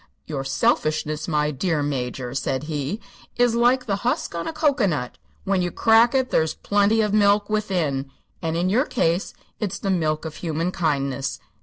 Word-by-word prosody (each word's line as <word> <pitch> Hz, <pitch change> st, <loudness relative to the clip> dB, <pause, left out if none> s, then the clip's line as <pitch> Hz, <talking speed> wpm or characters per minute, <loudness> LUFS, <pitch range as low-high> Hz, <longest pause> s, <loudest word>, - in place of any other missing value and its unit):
"Your 140 Hz, -4 st, -4 dB
selfishness, 155 Hz, +3 st, 0 dB
my 150 Hz, -2 st, +1 dB
dear 150 Hz, +2 st, -1 dB
Major," 125 Hz, -3 st, -3 dB
said 135 Hz, 0 st, -2 dB
he, 150 Hz, +5 st, -3 dB, 0.4 s
"is 245 Hz, -1 st, +3 dB
like 245 Hz, +2 st, +3 dB
the 200 Hz, -4 st, 0 dB
husk 240 Hz, -1 st, -1 dB
on 170 Hz, 0 st, -4 dB
a -, -, -1 dB
cocoanut. 245 Hz, -, 0 dB, 0.2 s
When 195 Hz, -1 st, +1 dB
you 175 Hz, -, 0 dB
crack 225 Hz, +6 st, +4 dB
it 260 Hz, -1 st, +1 dB
there's 160 Hz, -1 st, +1 dB
plenty 205 Hz, +2 st, +2 dB
of 210 Hz, -1 st, 0 dB
milk 205 Hz, 0 st, +3 dB
within 170 Hz, -11 st, -1 dB, 0.3 s
and 165 Hz, -1 st, -1 dB
in 175 Hz, +2 st, +1 dB
your 235 Hz, +9 st, +2 dB
case 175 Hz, -, 0 dB, 0.2 s
it's 205 Hz, -5 st, -2 dB
the 195 Hz, -, -2 dB
milk 155 Hz, -3 st, 0 dB
of 155 Hz, -1 st, -6 dB
human 165 Hz, +1 st, -2 dB
kindness. 140 Hz, -6 st, -1 dB
170 Hz, 170 wpm, -23 LUFS, 150-210 Hz, 0.4 s, crack